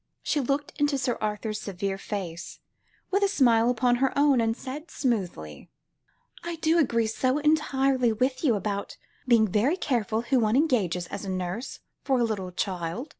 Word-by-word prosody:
She 300 - 0
looked 280 +2 -1
into 290 -1 +2
Sir 250 -3 -1
Arthur's 215 0 -3
severe 195 0 -3
face, 175 -5 -6 0.5
with 395 +2 +2
a 400 - +4
smile 240 - +3
upon 245 0 +2
her 265 +1 +2
own, 280 -4 +4
and 225 +1 0
said 290 +5 -7
smoothly 180 - -3 0.7
"I 340 0 -4
do 325 +1 +2
agree 230 -7 +2
so 255 +5 0
entirely 275 -5 +2
with 255 +5 -1
you 250 -7 +3
about 200 0 -3 0.3
being 230 -3 +5
very 225 - +1
careful 230 - 0
who 255 +1 +2
one 220 0 +2
engages 215 - +1
as 200 - -6
a 195 - -5
nurse 185 +6 -4 0.2
for 265 -2 +1
a - - +3
little 200 -5 -2
child. 180 - -3
235 Hz, 170 wpm, -26 LUFS, 205-275 Hz, 0.7 s, being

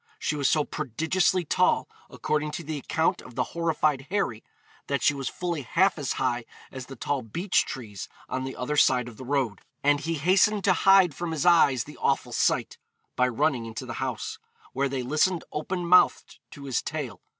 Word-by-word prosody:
She 155 - -2
was 140 -2 +1
so 150 - +3
prodigiously 160 +7 0
tall, - - +2 0.2
according 150 0 -2
to 170 - -5
the 155 -1 -4
account 160 +4 0
of 125 - -13
the 125 - +1
horrified 155 -4 0
Harry, 185 - -1 0.4
that 140 -1 -1
she 150 - +4
was 135 -2 -3
fully 175 -4 -3
half 170 +8 +2
as 140 - -1
high 125 -2 -1 0.3
as 130 -1 -8
the 135 - -9
tall 140 +3 -2
beech 170 - 0
trees 105 - -7 0.2
on 130 - -3
the 130 0 -5
other 135 +4 -3
side 125 -4 +4
of 115 -3 -11
the - - -8
road; 130 -6 -1 0.2
and 145 0 +4
he 165 +3 -2
hastened 190 +6 +3
to 190 - +4
hide 190 -2 +5
from 175 +3 -4
his 160 +1 -2
eyes 145 -9 +5
the - - -12
awful - - 0
sight, - - 0 0.4
by 125 - +3
running 120 0 0
into 110 0 -6
the - - -6
house, - - -4 0.3
where 140 +1 0
they 130 -1 -3
listened 155 +7 +1
open 175 +4 -3
mouthed 180 +2 +3
to 145 - -11
his 135 -4 -1
tale. 140 - -5
145 Hz, 195 wpm, -26 LUFS, 130-170 Hz, 0.4 s, hide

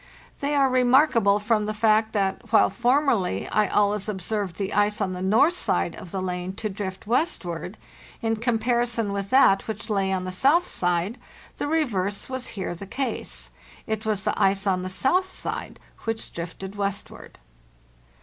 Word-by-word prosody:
They 285 +1 -1
are 275 -1 +4
remark 255 +3 +4
able 200 -3 +4
from 210 0 +1
the 215 - -2
fact 220 0 +3
that, 200 +2 -1
while 220 - +5
formerly 240 - +1
I 215 -1 +2
always 205 +1 +1
observed 200 -2 -2
the 195 -2 -3
ice 205 +1 +2
on 190 -3 -1
the 180 - -5
north 225 - +4
side 360 - 0
of 180 - -10
the 190 +1 -3
lane 180 0 -3
to 215 +2 -4
drift 190 -1 -6
westward, 205 - -1 0.4
in 225 0 0
comparison 230 -1 0
with 200 0 -3
that 260 -7 +5
which 220 0 -5
lay 195 -2 +1
on 185 -1 -1
the 185 - -4
south 285 - +3
side, 180 +6 -1 0.4
the - - -1
reverse 215 - -1
was 260 -1 -2
here 190 - -3
the 195 +3 -9
case. 265 +6 -4 0.3
It 220 0 -3
was 215 -3 -1
the - - +1
ice 195 +1 +3
on 185 -2 +1
the 185 - -4
south 305 - +2
side 375 - -5 0.3
which 225 0 -3
drifted 180 +3 -6
westward. 200 -1 -4
210 Hz, 170 wpm, -25 LUFS, 190-240 Hz, 0.4 s, while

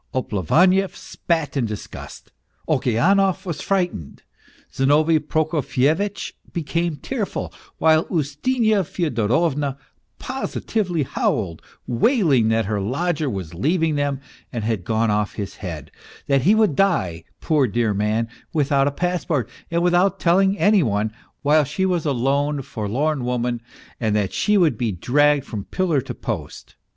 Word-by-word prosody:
Oplevaniev 175 - +2
spat 160 -4 -2
in 125 -5 +1
disgust, 105 -2 -8 0.4
Okeanov 190 - +2
was 170 -4 -4
frightened, 180 - -2 0.5
Zinovy 155 +4 +3
Prokofyevitch 155 +4 0 0.2
became 170 0 -1
tearful, 210 - -4 0.2
while 160 0 +4
Ustinya 200 - +1
Fyodorovna 145 - 0 0.4
positively 215 - -2
howled, 95 -9 -1 0.2
wailing 135 - +3
that 110 -1 +2
her 105 0 -1
lodger 155 - -1
was 95 -7 -5
leaving 160 - +1
them 145 -2 -1 0.3
and 115 -4 -4
had 110 -4 -1
gone 110 0 +1
off 105 0 -1
his 100 -3 -5
head, 80 -6 -7 0.3
that 140 -1 +2
he 195 +10 +4
would 215 -9 +3
die, 95 - +1 0.2
poor 150 -5 +2
dear 115 -1 0
man, 105 +3 0 0.3
without 140 -3 +2
a - - +1
passport 170 - -1 0.2
and 170 0 0
without 180 +2 +3
telling 190 +3 +3
any 205 -1 +4
one, 110 -4 0 0.3
while 150 +2 +4
she 190 +7 -1
was 175 -4 0
a - - +2
lone, 140 +3 0 0.2
lorn 130 +7 -1
woman 120 -1 -1 0.4
and 110 -3 0
that 105 -3 0
she 210 0 +2
would 170 -8 +2
be 120 -3 0
dragged 145 - +2
from 105 -3 -5
pillar 170 -7 0
to - - -7
post. - - -6
145 Hz, 135 wpm, -22 LUFS, 115-175 Hz, 0.5 s, while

